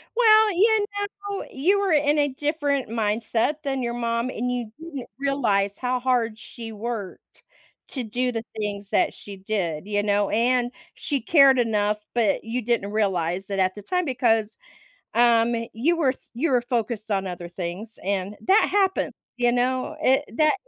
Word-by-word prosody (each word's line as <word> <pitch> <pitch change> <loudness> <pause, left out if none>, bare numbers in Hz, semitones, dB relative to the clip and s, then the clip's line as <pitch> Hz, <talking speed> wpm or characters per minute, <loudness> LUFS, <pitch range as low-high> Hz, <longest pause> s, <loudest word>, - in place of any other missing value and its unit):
Well, 440 -2 +6
you 425 +3 +4 0.4
know, 400 -1 -4
you 365 +10 +2
were 395 -4 +1
in 295 0 +3
a 290 - +3
different 285 -1 -1
mindset 225 +4 0
than 270 -2 -1
your 235 -1 -2
mom, 235 0 -1
and 250 0 -2
you 245 -3 -3
didn't 310 -5 -7
realize 220 -8 0
how 255 0 -1
hard 240 -4 +1
she 225 0 -9
worked 215 -3 -7 0.5
to 260 - -4
do 250 +3 -1
the 225 -1 -3
things 205 -2 -4
that - - +2
she 200 -1 -10
did, 190 -5 -2
you 205 -1 0
know, 205 -1 +1
and 245 +2 +2 0.2
she 280 -3 -2
cared 275 0 +6
enough, 210 -3 0
but 225 -5 +2
you 235 +3 -3
didn't 225 -3 -1
realize 190 -3 0
that 195 -1 -3
at 185 0 +2
the 205 - -8
time 360 - -1
because, 230 -5 +1 0.6
um, 235 0 +4 0.2
you 290 +10 +1
were 300 -5 +3
f 260 - -6
you 270 +6 0
were 250 -2 +3
focused 235 -3 -2
on 195 -1 0
other 175 -1 -6
things, 180 +5 -6
and 195 +1 -2
that 390 +3 +4
happened, 385 -2 +1 0.2
you 240 -1 +3
know, 255 +4 0
it 270 0 +3
that 310 -1 +4
235 Hz, 170 wpm, -24 LUFS, 210-275 Hz, 0.6 s, Well